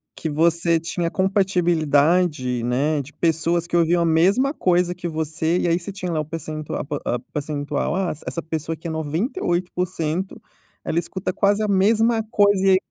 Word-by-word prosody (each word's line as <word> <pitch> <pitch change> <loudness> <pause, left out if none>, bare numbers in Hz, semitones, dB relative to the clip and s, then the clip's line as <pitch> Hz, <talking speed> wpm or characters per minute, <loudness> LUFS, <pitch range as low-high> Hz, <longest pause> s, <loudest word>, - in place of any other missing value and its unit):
que 160 - -4
você 165 +2 +2
tinha 170 +1 -3
compatibilidade, 170 - +2
né, 140 +5 +1
de 135 - -12
pessoas 170 +1 0
que 175 - 0
ouviam 170 +1 +3
a - - +1
mesma 195 - +3
coisa 180 0 +1
que 175 0 -5
você. 160 +1 -1
E - - 0
aí 170 +1 +3
você 175 - -6
tinha 185 -3 -5
lá 155 - -1
o - - -6
percentua 155 -1 -5
a - - -7
po 150 - -4
o 120 - 0
percentual, 145 0 -2
ah, 190 -2 0 0.2
essa 170 - -3
pessoa 160 0 -4
aqui 165 +1 -8
é - - -3
98% 175 - -2 0.4
ela 165 - 0
escuta 185 +2 -4
quase 205 +2 +2
a - - 0
mesma 220 +4 +3
coisa. 205 -3 +4
E - - +6
aí 185 - +6
170 Hz, 180 wpm, -22 LUFS, 155-185 Hz, 0.4 s, E